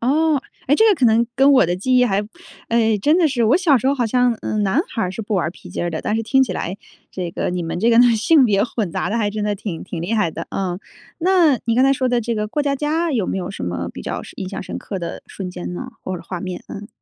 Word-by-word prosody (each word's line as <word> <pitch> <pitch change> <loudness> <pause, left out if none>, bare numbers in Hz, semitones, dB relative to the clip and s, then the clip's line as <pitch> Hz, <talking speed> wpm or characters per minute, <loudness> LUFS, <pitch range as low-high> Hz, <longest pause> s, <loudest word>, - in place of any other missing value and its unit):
哦， 295 +3 +2 0.3
哎， 285 - +4
这 445 - +4
个 415 - +5
可 265 -8 +3
能 230 +1 +3
跟 270 +2 +5
我 260 -8 +5
的 175 - 0
记 255 +8 +1
忆 250 - +5
还 200 -3 +1 0.5
哎， 225 -2 +2
真 300 - +3
的 335 - +4
是 245 -4 0
我 230 +8 +4
小 315 -8 +4
时 260 - -3
候 275 - +3
好 245 -4 0
像， 245 +1 +2
嗯， 215 -1 -1
男 200 +9 +2
孩 225 - -2
儿 180 - -1
是 225 - -5
不 210 0 -3
玩 175 -3 0
皮 180 - -14
筋 - - -3
儿 175 - -1
的， 160 - -3
但 210 - -1
是 225 - 0
听 265 +4 +3
起 225 - -1
来 180 +1 -4 0.3
这 180 -2 -4
个 - - -2
你 180 -1 -2
们 165 +1 -4
这 230 - +3
个 230 - +5 0.2
性 275 +6 +4
别 200 -4 +3
混 220 -6 -2
杂 - - -2
得 220 - -1
还 210 -3 0
真 210 0 -4
的 210 0 0
挺 185 -4 -6
挺 175 -2 -6
厉 185 +7 -3
害 210 -7 +1
的。 165 +1 -7
嗯， 185 -2 -2 0.4
那 345 -6 +4
你 230 0 +1
刚 255 - +4
才 270 0 +5
说 260 -1 0
的 245 -1 +1
这 235 +1 -2
个 210 0 -1
过 295 +7 -2
家 280 -1 0
家 315 +4 0
有 225 -9 0
没 195 - -2
有 180 - -4
什 195 - -7
么 90 0 -3
比 - - -8
较 - - -4
是 - - -11
印 190 - -5
象 195 - -5
深 - - -6
刻 195 - -6
的 170 - -6
瞬 185 -2 -7
间 180 0 -6
呢？ 255 +8 -6
或 185 - -4
者 170 - -10
画 175 +1 -6
面， 185 -1 -5
嗯。 200 +1 -7
225 Hz, 315 characters per minute, -20 LUFS, 185-265 Hz, 0.5 s, 个